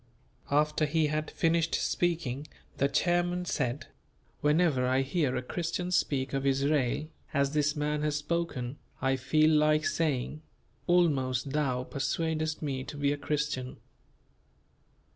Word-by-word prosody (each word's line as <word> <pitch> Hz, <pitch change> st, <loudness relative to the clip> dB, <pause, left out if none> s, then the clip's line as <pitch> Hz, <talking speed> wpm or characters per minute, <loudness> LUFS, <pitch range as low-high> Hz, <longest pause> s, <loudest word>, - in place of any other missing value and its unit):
After 150 Hz, +1 st, +2 dB
he 160 Hz, +1 st, +2 dB
had 155 Hz, 0 st, -1 dB
finished 165 Hz, 0 st, +1 dB
speaking 155 Hz, -5 st, -1 dB, 0.3 s
the 140 Hz, -, +3 dB
chairman 175 Hz, +3 st, +1 dB
said, 130 Hz, -5 st, -2 dB, 0.5 s
"Whenever 150 Hz, -4 st, +2 dB
I 130 Hz, +1 st, +2 dB
hear 140 Hz, -1 st, 0 dB
a 130 Hz, -, -2 dB
Christian 175 Hz, +5 st, -3 dB
speak 140 Hz, -6 st, 0 dB
of 135 Hz, 0 st, 0 dB
Israel 140 Hz, +1 st, +1 dB, 0.3 s
as 140 Hz, 0 st, +2 dB
this 150 Hz, 0 st, +1 dB
man 150 Hz, 0 st, -1 dB
has 150 Hz, -1 st, 0 dB
spoken, 150 Hz, -4 st, -2 dB, 0.2 s
I 135 Hz, 0 st, +2 dB
feel 155 Hz, +5 st, +3 dB
like 155 Hz, 0 st, +3 dB
saying, 150 Hz, -2 st, -1 dB, 0.5 s
'Almost 140 Hz, -7 st, +2 dB
thou 135 Hz, -4 st, 0 dB
persuadest 155 Hz, +4 st, -2 dB
me 135 Hz, -3 st, -2 dB
to 145 Hz, -, -8 dB
be 145 Hz, 0 st, +1 dB
a -, -, -4 dB
Christian. 145 Hz, -3 st, -2 dB
150 Hz, 130 wpm, -30 LUFS, 135-160 Hz, 0.5 s, the